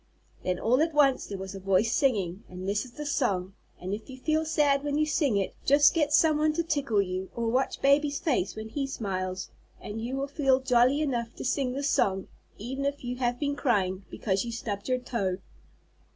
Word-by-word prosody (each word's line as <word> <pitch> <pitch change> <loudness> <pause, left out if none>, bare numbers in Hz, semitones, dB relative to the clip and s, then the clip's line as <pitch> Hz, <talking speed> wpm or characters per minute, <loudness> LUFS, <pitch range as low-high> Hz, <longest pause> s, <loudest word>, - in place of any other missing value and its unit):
Then, 180 -1 0
all 250 +5 +3
at 320 -1 0
once, 275 -3 +3
there 200 - -5
was 190 0 -6
a 195 - -7
voice 195 +4 +2
singing, 205 -8 +1
and 185 +1 -7
this 205 +4 0
is 245 - -14
the 300 +3 -6
song, 195 -10 0 0.3
and 185 +2 -4
if 215 +4 -6
you 260 - -8
feel 310 +4 0
sad 290 -3 +2
when 290 0 -1
you 305 - +3
sing 285 - +1
it, 195 - -1
just 285 +1 +5
get 300 -3 +1
some 310 0 +4
one 305 0 +2
to 335 +2 0
tickle 275 -10 +1
you, 185 0 -4
or 235 -1 -1
watch 260 +2 0
baby's 285 +1 +3
face 245 - 0
when 220 0 -6
he 275 +4 -2
smiles, 185 -6 -4 0.3
and 220 +2 -6
you 245 +3 -3
will 275 - -1
feel 275 -2 +2
jolly 260 +2 +3
enough 240 -6 -2
to - - -6
sing 255 -1 0
this 280 +2 -1
song, 190 -1 +1 0.3
even 265 +6 -4
if 280 0 -2
you 250 0 -4
have 245 -1 -1
been 285 -1 -1
crying 195 -9 0
because 195 -3 -1
you 235 - -5
stubbed 210 -2 -4
your 255 - +2
toe. 220 -7 -2
250 Hz, 215 wpm, -28 LUFS, 200-285 Hz, 0.3 s, just